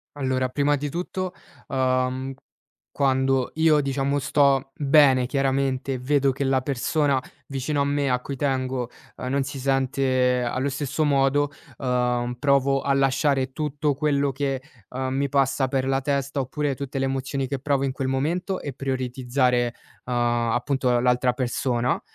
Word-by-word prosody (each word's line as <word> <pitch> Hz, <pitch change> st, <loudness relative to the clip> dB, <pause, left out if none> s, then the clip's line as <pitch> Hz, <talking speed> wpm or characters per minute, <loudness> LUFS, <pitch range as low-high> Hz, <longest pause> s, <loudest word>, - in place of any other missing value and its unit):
Allora, 130 Hz, -2 st, 0 dB
prima 145 Hz, +2 st, +2 dB
di 145 Hz, +1 st, -3 dB
tutto, 180 Hz, +3 st, -4 dB, 0.3 s
uhm, 130 Hz, 0 st, 0 dB, 0.6 s
quando 130 Hz, -2 st, +1 dB
io 160 Hz, -1 st, +4 dB
diciamo 140 Hz, +1 st, 0 dB
sto 140 Hz, -1 st, +2 dB
bene 135 Hz, -3 st, +4 dB
chiaramente 135 Hz, -1 st, 0 dB
e -, -, -2 dB
vedo 140 Hz, +1 st, +2 dB
che 140 Hz, +2 st, -3 dB
la 135 Hz, -1 st, +2 dB
persona 140 Hz, +1 st, 0 dB, 0.2 s
vicino 140 Hz, +2 st, -2 dB
a -, -, +2 dB
me, 140 Hz, -1 st, 0 dB
a 125 Hz, 0 st, +2 dB
cui 140 Hz, +2 st, -6 dB
tengo, 130 Hz, -2 st, -1 dB, 0.3 s
uhm, 125 Hz, -, -5 dB
non 140 Hz, +1 st, +1 dB
si 135 Hz, 0 st, -6 dB
sente 130 Hz, -1 st, +1 dB
allo 130 Hz, +3 st, -1 dB
stesso 140 Hz, +2 st, -2 dB
modo, 140 Hz, 0 st, +2 dB, 0.3 s
uhm, 125 Hz, -1 st, 0 dB
provo 140 Hz, -1 st, +3 dB
a 140 Hz, -, +1 dB
lasciare 135 Hz, 0 st, +2 dB
tutto 150 Hz, -1 st, -1 dB
quello 140 Hz, -1 st, +1 dB
che, 135 Hz, 0 st, -2 dB, 0.3 s
uhm, 130 Hz, 0 st, -3 dB
mi 140 Hz, +1 st, 0 dB
passa 135 Hz, 0 st, +2 dB
per 130 Hz, 0 st, -1 dB
la 135 Hz, 0 st, +1 dB
testa, 140 Hz, 0 st, -1 dB
oppure 140 Hz, +2 st, -1 dB
tutte 140 Hz, 0 st, -5 dB
le 135 Hz, -, +1 dB
emozioni 135 Hz, 0 st, -2 dB
che 140 Hz, 0 st, -3 dB
provo 140 Hz, 0 st, 0 dB
in 135 Hz, -, 0 dB
quel 130 Hz, 0 st, -3 dB
momento 170 Hz, +8 st, -1 dB
e 140 Hz, -, -6 dB
prioritizzare, 125 Hz, -2 st, 0 dB, 0.3 s
uhm, 125 Hz, -, -3 dB
appunto 120 Hz, +2 st, +1 dB
l'altra 125 Hz, 0 st, +2 dB
persona, 125 Hz, -1 st, -1 dB
135 Hz, 155 wpm, -24 LUFS, 130-140 Hz, 0.6 s, io